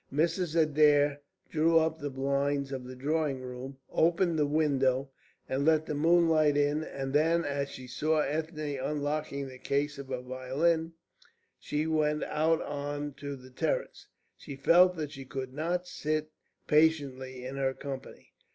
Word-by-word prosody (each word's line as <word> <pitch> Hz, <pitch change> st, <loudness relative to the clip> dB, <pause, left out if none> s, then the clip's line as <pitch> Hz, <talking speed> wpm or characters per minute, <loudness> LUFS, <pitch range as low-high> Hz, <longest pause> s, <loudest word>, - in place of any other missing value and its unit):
Mrs. 165 Hz, +3 st, +1 dB
Adair 145 Hz, -2 st, +4 dB, 0.3 s
drew 165 Hz, +1 st, +3 dB
up 160 Hz, 0 st, +2 dB
the 145 Hz, -1 st, -3 dB
blinds 140 Hz, +1 st, -1 dB
of 130 Hz, -2 st, -5 dB
the 130 Hz, 0 st, -8 dB
drawing 145 Hz, +1 st, -1 dB
room, 130 Hz, +1 st, -7 dB
opened 170 Hz, 0 st, +2 dB
the 150 Hz, -, +3 dB
window, 135 Hz, -3 st, +1 dB, 0.4 s
and 135 Hz, +2 st, -1 dB
let 155 Hz, 0 st, +3 dB
the -, -, -3 dB
moonlight 160 Hz, -1 st, +4 dB
in; 145 Hz, +2 st, +2 dB
and 135 Hz, -3 st, -5 dB
then, 165 Hz, +3 st, +3 dB
as 140 Hz, -1 st, -2 dB
she 130 Hz, -, -9 dB
saw 155 Hz, +5 st, +1 dB
Ethne 150 Hz, -1 st, -3 dB
unlocking 145 Hz, -1 st, -2 dB
the 130 Hz, -1 st, -11 dB
case 140 Hz, +1 st, -1 dB
of 140 Hz, -, -7 dB
her 130 Hz, -1 st, -4 dB
violin, 140 Hz, +6 st, 0 dB, 0.7 s
she 150 Hz, +1 st, -2 dB
went 150 Hz, -1 st, +1 dB
out 160 Hz, +1 st, +1 dB
on 145 Hz, 0 st, -4 dB
to 140 Hz, +1 st, -6 dB
the 130 Hz, -1 st, -14 dB
terrace. -, -, -2 dB, 0.3 s
She 140 Hz, -, -9 dB
felt 180 Hz, +6 st, +5 dB
that 155 Hz, -3 st, -4 dB
she 135 Hz, -3 st, -8 dB
could 130 Hz, 0 st, -6 dB
not 175 Hz, +5 st, -2 dB
sit 155 Hz, -2 st, -2 dB, 0.3 s
patiently 135 Hz, -5 st, +1 dB
in 135 Hz, +2 st, -5 dB
her 135 Hz, -1 st, 0 dB
company. 135 Hz, -2 st, -8 dB
145 Hz, 155 wpm, -30 LUFS, 135-160 Hz, 0.7 s, felt